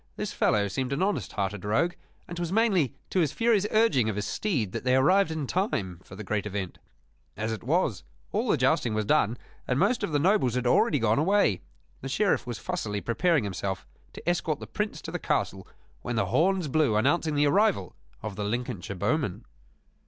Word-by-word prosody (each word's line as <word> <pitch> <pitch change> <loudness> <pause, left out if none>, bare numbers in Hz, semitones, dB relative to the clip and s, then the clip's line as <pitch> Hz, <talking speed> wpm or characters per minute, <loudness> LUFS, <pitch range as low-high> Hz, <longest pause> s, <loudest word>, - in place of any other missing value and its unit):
This - - -4
fellow 100 -1 +2
seemed 130 +6 -2
an 145 - 0
honest 205 +1 -1
hearted 100 -1 -2
rogue; 110 +13 +1 0.3
and 175 - -7
'twas 175 -1 -3
mainly 195 - +2 0.2
to 190 - +1
his 155 -6 +2
furious 225 -3 +2
urging 215 - +3
of 105 - -2
his 105 0 -2
steed 125 - -1
that - - -4
they 125 0 +3
arrived 180 +8 +4
in 160 -3 -3
time 115 - -2
for 95 - -12
the 110 - -7
great 105 +1 -2
event. 95 -3 -5 0.6
As 110 +2 -2
it 110 - -4
was, 145 - +1 0.3
all - - 0
the - - +3
jousting 110 -2 +2
was 110 -1 0
done, 120 -3 +2 0.3
and 125 - +1
most 200 - +2
of - - -2
the 145 - +2
nobles 155 - +2
had 125 0 -1
already 125 +4 +3
gone 115 -1 +2
away. 165 - +2 0.4
The 135 - -5
Sheriff 190 -1 +1
was 120 -2 -4
fussily 110 - -3
preparing 135 - +1
himself 95 -1 -3 0.3
to - - -11
escort 165 -4 0
the - - -7
Prince 210 0 -4
to - - -6
the - - -3
castle 95 -1 -1 0.3
when 120 - -3
the 115 - +1
horns 185 0 +2
blew 140 -5 +2
announcing 145 +7 +2
the 145 +1 +3
arrival 145 - +2 0.3
of 110 -2 -5
the 105 - -3
Lincolnshire 105 -3 -3
bowmen. 140 - -1
130 Hz, 200 wpm, -27 LUFS, 105-175 Hz, 0.6 s, arrived